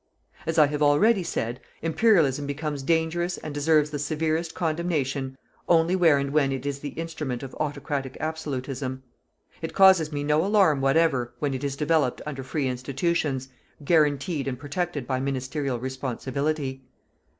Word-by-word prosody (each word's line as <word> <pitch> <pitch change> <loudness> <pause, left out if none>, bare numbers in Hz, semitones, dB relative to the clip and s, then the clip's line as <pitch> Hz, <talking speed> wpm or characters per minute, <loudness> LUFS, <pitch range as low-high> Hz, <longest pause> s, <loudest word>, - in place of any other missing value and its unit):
As 165 0 -1
I 155 - +8
have 145 +1 -3
already 185 +9 +4
said, 120 -8 -3 0.2
Imperialism 160 - +3
becomes 145 0 -3
dangerous 165 +4 0
and 155 - -7
deserves 150 +1 +2
the 145 - -3
severest 160 +3 -1
condemnation, 150 -5 -1 0.3
only 170 +1 +4
where 165 -6 +5
and 140 0 -1
when 140 -3 +3
it 135 0 -4
is 140 -1 -2
the 145 - -5
instrument 155 -7 -4
of 130 - -7
autocratic 145 -3 -3
absolutism. 135 -4 -4 0.6
It - - -5
causes 190 -5 +6
me 145 -1 -2
no 150 +2 +2
alarm 190 -8 +3
whatever 135 -4 +2
when 140 +1 -1
it 130 +1 -4
is 140 -1 -2
developed 150 -3 +1
under 145 -3 -5
free 135 +1 -2
institutions, 135 +1 -1 0.4
guaranteed 150 -1 +2
and 130 -2 -2
protected 145 +1 -3
by 130 +1 -1
ministerial 135 0 -2
responsibility. 130 +2 -3
145 Hz, 150 wpm, -26 LUFS, 135-160 Hz, 0.6 s, I